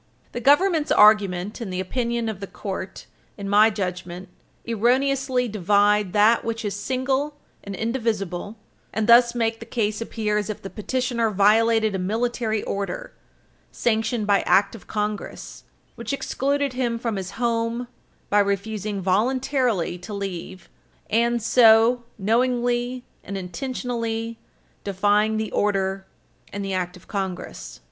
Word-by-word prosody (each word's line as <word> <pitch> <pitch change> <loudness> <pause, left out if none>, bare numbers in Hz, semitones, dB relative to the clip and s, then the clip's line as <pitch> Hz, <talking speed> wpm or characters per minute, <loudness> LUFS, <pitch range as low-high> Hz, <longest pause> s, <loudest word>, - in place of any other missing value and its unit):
The 240 - -5
Government's 310 +3 +3
argument, 210 -1 +4
and 210 -5 -4
the 185 - -3
opinion 235 +4 -2
of 215 -4 -4
the 195 - -6
court, 190 -2 -6 0.3
in 200 -1 -6
my 210 +2 +6
judgment, 180 -3 -5 0.4
erroneously 250 +2 +1
divide 205 -1 +2
that 215 +3 +4
which 225 -1 -3
is 205 - -2
single 265 +6 -1 0.3
and 200 -1 -6
indivisible, 220 -4 -2 0.3
and 220 0 -1
thus 235 +1 +6
make 225 -1 0
the 230 - -9
case 215 -2 -1
appear 215 -2 -1
as 205 - -4
if 215 - -4
the 195 - -7
petitioner 240 0 -1
violated 220 +2 +3
a 190 - -2
Military 220 +2 -1
Order, 200 - -4 0.6
sanctioned 220 -1 0
by 200 -1 +3
Act 195 0 +4
of 225 - -12
Congress, 210 -1 -4 0.3
which 235 +2 -5
excluded 275 0 -1
him 245 -2 -1
from 230 -2 -2
his 190 0 -5
home 235 0 -1 0.4
by 205 - +5
refusing 200 0 -1
voluntarily 230 - +1
to 205 +4 -7
leave, 190 -2 -6 0.4
and 235 +1 +2
so 235 0 +5
knowingly 245 +3 0 0.2
and 200 +1 -5
intentionally 230 +3 -4 0.4
defying 205 +2 +2
the 220 -1 -3
order 195 -1 0 0.4
and 200 0 -4
the 195 - -3
Act 180 0 -2
of 180 - -20
Congress. 190 -3 -5
220 Hz, 135 wpm, -23 LUFS, 200-240 Hz, 0.6 s, my